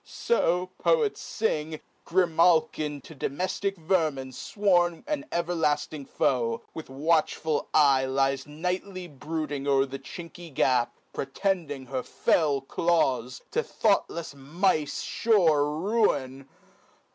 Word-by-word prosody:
So 180 - 0
(poets 460 -4 +2 0.2
fing) 155 -8 -1 0.3
Grimalkin 165 -4 +2
to - - -11
domeftic 185 +7 -2
vermin 155 -6 0
fworn 175 - +1
An 300 -1 -2
everlafting 155 -4 -1
foe, 115 -3 0
with 160 - -7
\vatchful 155 +2 0
eye 140 -3 +5
Lies 135 +1 0
nightly 180 +4 -4
brooding 150 -1 -4
o'er 135 -1 +4
a 135 0 -6
chinky 170 +1 -10
gap, 125 -2 +1 0.2
Protending 145 -2 -2
her 130 0 -3
fell 145 -1 +1
claws, 135 -5 0
to 470 - +1
thoughtlefs 170 - 0
mice 150 +2 0
Sure 165 -10 +3
ruin. 150 - 0
155 Hz, 105 wpm, -27 LUFS, 135-180 Hz, 0.3 s, eye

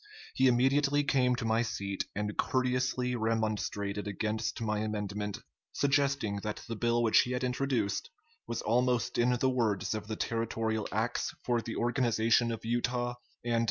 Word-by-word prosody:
He 130 - +4
immediately 140 +4 +3
came 130 -3 +2
to 120 - -4
my 110 +1 +2
seat 100 -4 -3
and 105 +1 -2
courteously 125 -1 0
remonstrated 110 -3 -1
against 105 +2 -2
my 105 -2 -1
amendment, 105 -1 -3 0.4
suggesting 140 -7 +1
that 105 +1 -4
the 115 - -3
bill 120 +1 +1
which 115 - +5
he 125 - +2
had 125 - -2
introduced 125 -5 0 0.4
was 115 - -3
almost 120 +1 +1
in 120 +1 +4
the 130 - +2
words 110 -7 0
of 105 -1 -5
the 110 - -3
territorial 110 -1 -1
acts 110 +4 -1
for 120 -1 +1
the 115 - -5
organization 115 -1 +2
of 115 0 -5
Utah 120 +1 0 0.3
and. 120 -1 +2
115 Hz, 155 wpm, -31 LUFS, 110-125 Hz, 0.4 s, which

